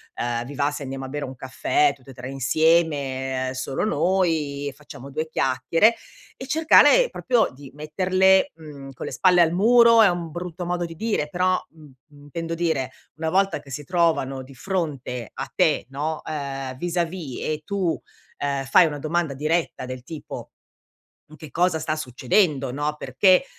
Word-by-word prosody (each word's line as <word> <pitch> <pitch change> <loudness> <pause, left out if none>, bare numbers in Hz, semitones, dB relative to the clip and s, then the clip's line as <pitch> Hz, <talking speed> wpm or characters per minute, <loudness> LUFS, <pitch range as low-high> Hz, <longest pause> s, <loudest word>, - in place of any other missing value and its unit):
ehm: 120 0 -2
"Vi 145 - -8
va 145 +1 +1
se 145 - -6
andiamo 135 0 -5
a - - -6
bere 145 +1 -4
un 130 - -8
caffè, 345 - +1
tutte 135 - -15
e - - -12
tre 125 0 -7
insieme, 135 -2 +1
solo 130 +1 -3
noi, 160 - 0
facciamo 140 -2 -11
due 155 +3 -3
chiacchiere" 145 - +2 0.5
e 260 - -6
cercare 320 - +6
proprio 245 -4 +1
di 135 +1 -12
metterle, 185 +5 +2
mhmm, 145 -4 -10
con - - -7
le - - -5
spalle 180 +8 +4
al 165 -1 +4
muro, 230 +5 +6
è 215 - +7
un 175 -2 -3
brutto 175 +1 -6
modo 175 0 -1
di 165 -1 -8
dire, 210 -5 -1
però, 185 +2 +1
mhmm, 160 -1 -17 0.3
mhmm, 145 -1 -18
intendo 165 +3 -5
dire, 160 -6 -1 0.2
una 160 +1 -2
volta 195 0 +1
che 145 -1 -16
si 145 +3 -5
trovano 155 -5 +1
di 135 +2 -14
fronte 135 - -3
a - - -6
te, - - +2
no, 150 +3 -3
eh 135 -3 -5
vis 175 +4 -4
a 175 - +4
vis 165 -6 -6
e 155 0 -2
tu, 190 -5 -1 0.4
ehm, 140 -1 -2
fai 155 +6 +6
una 150 -2 -3
domanda 160 0 -1
diretta 155 0 -1
del 130 -1 -7
tipo: 155 +3 -8 0.9
"Che 155 0 -11
cosa 175 +1 +1
sta 155 0 -2
succedendo?", 135 - +1
no, 145 +2 -2
"Perché, 180 - +3
155 Hz, 175 wpm, -23 LUFS, 135-175 Hz, 0.9 s, è